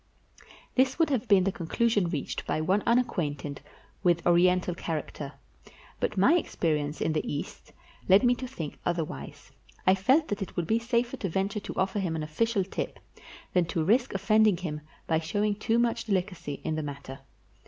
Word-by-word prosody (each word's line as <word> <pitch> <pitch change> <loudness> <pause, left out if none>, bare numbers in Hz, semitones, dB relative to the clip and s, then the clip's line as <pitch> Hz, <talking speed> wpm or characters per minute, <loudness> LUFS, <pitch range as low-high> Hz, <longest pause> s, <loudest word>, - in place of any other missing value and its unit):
This 260 0 +2
would 320 -2 +2
have 250 -3 0
been 195 -3 +5
the 195 - +1
conclusion 200 +2 +1
reached 150 -5 -4
by - - 0
one 185 +6 +2
unacquainted 155 - 0 0.4
with 170 -2 +2
Oriental 180 +1 +4
character; 150 -4 -5 0.7
but - - -1
my 200 - +5
experi 160 - 0
ence 145 +1 -5
in 160 - +1
the 155 - -1
East 145 - -6 0.4
led 190 +5 +7
me 245 0 +5
to 255 +1 -5
think 165 - -7
otherwise. 160 - -4 0.3
I 185 - +6
felt 260 +12 +3
that 205 0 -2
it 195 - -5
would 175 - -1
be 220 +7 +2
safer 235 +1 0
to 195 - -3
venture 195 +4 -1
to - - -7
offer 190 +2 0
him 175 -4 -1
an 155 - -2
official 200 +7 0
tip 190 - -4 0.6
than 180 -2 +3
to 165 -1 -1
risk 235 +6 +2
offending 215 0 +4
him 155 -4 -4 0.2
by 160 -1 +1
showing 205 +6 0
too 225 +3 0
much 235 -1 +1
delicacy 185 -8 -2
in 160 - -1
the 155 - -1
matter. 140 -2 -7
185 Hz, 180 wpm, -28 LUFS, 160-220 Hz, 0.7 s, led